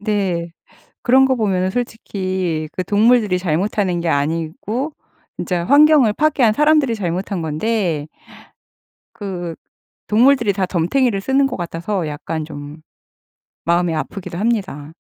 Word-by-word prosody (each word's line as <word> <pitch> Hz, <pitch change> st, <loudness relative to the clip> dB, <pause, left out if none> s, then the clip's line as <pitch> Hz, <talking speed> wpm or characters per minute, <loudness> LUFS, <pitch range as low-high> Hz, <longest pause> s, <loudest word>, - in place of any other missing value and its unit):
네. 195 Hz, -5 st, -1 dB, 0.5 s
그런 265 Hz, +2 st, +5 dB
거 265 Hz, -, +2 dB
보면은 190 Hz, -4 st, 0 dB
솔직히 185 Hz, -8 st, -3 dB
그 185 Hz, -, -2 dB
동물들이 210 Hz, -1 st, +3 dB
잘못하는 180 Hz, +1 st, 0 dB
게 170 Hz, -, -2 dB
아니고 165 Hz, -, -2 dB, 0.4 s
진짜 175 Hz, -2 st, -2 dB
환경을 285 Hz, -, +5 dB
파괴한 275 Hz, -6 st, +3 dB
사람들이 300 Hz, -3 st, +3 dB
잘못한 185 Hz, -1 st, -3 dB
건데 160 Hz, -1 st, -1 dB, 1.1 s
그 175 Hz, -5 st, -5 dB, 0.5 s
동물들이 235 Hz, -1 st, +4 dB
다 190 Hz, -1 st, 0 dB
덤터기를 195 Hz, +5 st, +1 dB
쓰는 270 Hz, +5 st, +2 dB
것 255 Hz, -, -5 dB
같아서 175 Hz, +1 st, -3 dB
약간 155 Hz, +1 st, -4 dB
좀 145 Hz, 0 st, -9 dB, 0.8 s
마음이 170 Hz, 0 st, +1 dB
아프기도 170 Hz, +2 st, -5 dB
합니다. 190 Hz, -9 st, -2 dB
190 Hz, 275 characters per minute, -19 LUFS, 170-230 Hz, 1.1 s, 그런